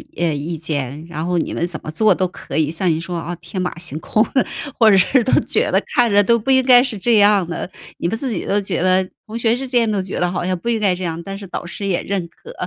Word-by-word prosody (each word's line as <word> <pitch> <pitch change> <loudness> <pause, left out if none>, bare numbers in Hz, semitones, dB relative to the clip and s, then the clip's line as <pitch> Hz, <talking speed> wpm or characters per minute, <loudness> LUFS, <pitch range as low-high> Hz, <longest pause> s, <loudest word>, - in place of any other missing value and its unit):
呃， 170 -1 0
意 155 +4 -4
见， 150 -2 -4
然 160 -1 -4
后 175 0 0
你 - - -3
们 170 - -1
怎 175 - -4
么 - - -6
做 200 +6 +3
都 185 +1 0
可 175 - -7
以， 155 -2 +2
像 170 +3 -2
你 160 0 -1
说， 175 +1 -4
啊， 170 +2 -4
天 190 - -7
马 180 -1 -2
行 160 -3 -4
空， 215 +5 +1 0.6
或 225 -2 +6
者 - - +6
是 230 +7 +3
都 260 - 0
觉 - - +1
得 - - +3
看 240 -3 +3
着 205 0 +5
都 235 +3 +3
不 230 +5 -1
应 260 0 +5
该 250 -1 +7
是 260 -4 -3
这 230 +4 +1
样 205 -2 +5
的， 175 - -4 0.3
你 - - -2
们 185 - -1
自 260 +3 -1
己 210 -7 -3
都 205 +1 +1
觉 190 - -2
得 185 0 +2 0.2
同 225 +1 -6
学 230 0 +2
之 265 +2 -5
间 240 -3 +2
都 205 - 0
觉 185 0 -4
得 180 0 +1
好 175 - -3
像 185 0 0
不 180 +7 -4
应 230 -1 +1
该 200 -3 +2
这 180 +1 -5
样， 165 -1 -3
但 195 0 -6
是 200 0 -9
导 175 - -6
师 200 +3 -5
也 180 - -1
认 190 -3 -3
可。 470 - -13
185 Hz, 310 characters per minute, -19 LUFS, 170-220 Hz, 0.6 s, 该